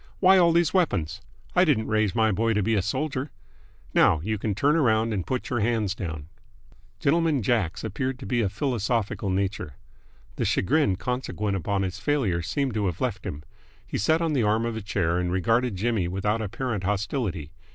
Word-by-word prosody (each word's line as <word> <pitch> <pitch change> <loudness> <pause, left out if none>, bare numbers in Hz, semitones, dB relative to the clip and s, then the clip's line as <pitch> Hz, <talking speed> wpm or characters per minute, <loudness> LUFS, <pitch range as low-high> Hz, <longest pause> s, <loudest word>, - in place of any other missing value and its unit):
"Why 190 0 +6
all 170 -1 +5
these 170 -1 +2
weapons? 95 - 0 0.3
I 180 - +6
didn't 135 -11 +2
raise 110 -2 +1
my 110 -2 +3
boy 115 +3 +1
to 105 - +1
be 115 - +1
a 105 - +2
soldier! 135 - -2 0.6
Now 80 - +4
you 110 +1 -2
can 105 -1 -1
turn 145 +8 +3
around 115 -7 +2
and 95 -4 -3
put 130 -1 -3
your 120 - +1
hands 110 -3 +1
down." 80 -7 -6 0.7
Gentleman 155 -3 +2
Jack's 100 -6 0
appeared 130 +5 -2
to 130 - -9
be 120 -2 0
a 100 - +1
philosophical 110 -2 -1
nature. 95 -7 -2 0.6
The - - 0
chagrin 135 - +2
consequent 105 -3 -2
upon 95 +2 -1
his 95 +1 -4
failure 115 - 0
seemed 135 - -1
to 105 -2 0
have 85 - -3
left - - -2
him. 75 +2 -6 0.4
He - - -4
sat 160 - +2
on 160 -2 0
the 135 - +2
arm 110 +1 +2
of 115 -1 -2
a 110 - -4
chair 90 -4 0
and 90 -1 -1
regarded 115 +5 +1
Jimmy 105 -2 0
without 105 +5 -1
apparent 110 -1 -3
hostility. 100 - -2
110 Hz, 190 wpm, -26 LUFS, 95-130 Hz, 0.7 s, Why